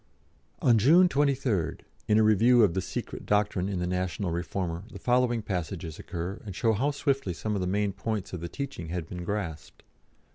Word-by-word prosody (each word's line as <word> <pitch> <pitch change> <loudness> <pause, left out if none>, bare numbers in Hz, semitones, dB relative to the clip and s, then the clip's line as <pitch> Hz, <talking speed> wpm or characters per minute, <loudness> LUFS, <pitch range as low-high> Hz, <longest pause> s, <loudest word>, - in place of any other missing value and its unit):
On 115 -3 +5
June 165 - +6
23rd, 135 - 0 0.3
in 105 - +4
a 110 - +5
review 115 +3 +5
of 95 -5 +3
"The 95 - 0
Secret - - -5
Doctrine" 105 -2 +1
in 100 - -2
the 90 - -1
National 90 +1 -2
Reformer, 85 0 -3
the - - -8
following 120 -2 +1
passages 85 -4 -4
occur, 90 +2 -5
and 100 -4 -7
show 115 +2 +2
how 130 +8 +1
swiftly 140 - -1
some 105 +5 -3
of 100 - -1
the 90 - -1
main 100 +1 0
points 110 -2 -3
of 90 - -3
the 85 - -5
teaching 135 - -5
had 85 -1 -3
been 90 +1 -6
grasped. 85 -5 -5
100 Hz, 190 wpm, -28 LUFS, 90-115 Hz, 0.3 s, June